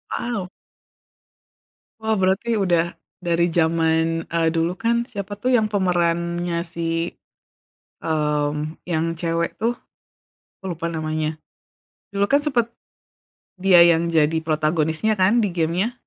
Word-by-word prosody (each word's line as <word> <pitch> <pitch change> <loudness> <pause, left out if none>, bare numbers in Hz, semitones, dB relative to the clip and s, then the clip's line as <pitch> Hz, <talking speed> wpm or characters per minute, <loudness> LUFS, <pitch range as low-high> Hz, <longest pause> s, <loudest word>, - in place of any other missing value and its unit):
Wow. 205 -7 -3 1.5
Wah, 220 0 +1
berarti 190 +5 +1
udah 175 -2 +1 0.2
dari 170 -1 +1
jaman, 165 0 +1
eee, 165 -1 +1
dulu 165 +3 0
kan? 230 +1 +1
Siapa 205 -3 -5
tuh 225 +5 -2
yang 220 - +2
pemerannya 175 -3 0
si, 165 0 -2 0.9
mmm, 150 0 -1
yang 160 0 +1
cewek 165 0 -1
tuh. 240 +2 0 0.8
Aku - - -28
lupa 170 0 -4
namanya. 155 -1 -2 0.8
Dulu 200 - +2
kan 285 - +5
sempet, 240 -6 0 0.9
dia 180 -2 +7
yang 170 0 +3
jadi 160 -1 +2
protagonisnya 160 +5 0
kan 215 +5 +4
di 195 - -1
game-nya? 175 +7 0
170 Hz, 115 wpm, -22 LUFS, 160-195 Hz, 1.5 s, dia